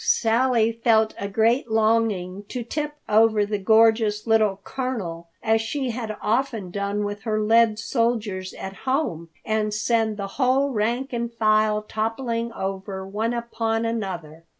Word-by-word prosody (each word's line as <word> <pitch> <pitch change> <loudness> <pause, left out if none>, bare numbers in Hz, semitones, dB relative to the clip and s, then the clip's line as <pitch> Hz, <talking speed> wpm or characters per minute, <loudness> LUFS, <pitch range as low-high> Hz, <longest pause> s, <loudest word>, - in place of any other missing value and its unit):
Sally 230 0 +3
felt 225 -1 +2
a 200 - -3
great 225 +5 +2
longing 215 -4 +1
to 250 -2 -4
tip 300 +5 -3
over 215 -1 +4
the 205 0 -2
gorgeous 220 0 +3
little 215 -4 +2
Colonel, 200 -11 -4 0.2
as 220 0 +3
she 255 +3 -2
had 220 -3 -5
often 225 -4 -1
done 200 +1 -2
with 205 0 -4
her 215 0 -1
lead 220 0 +4
soldiers 220 -6 -1
at 190 0 -7
home, 260 - -2 0.2
and 215 -1 0
send 220 -1 +1
the 200 - -3 0.2
whole 265 +2 +3
rank 240 +4 -1
and 235 0 -2
file 215 -1 +2
toppling 230 +2 -2
over, 190 -1 -4
one 220 +5 -2
upon 230 -1 -1
another. 180 -8 -4
220 Hz, 145 wpm, -24 LUFS, 205-235 Hz, 0.2 s, over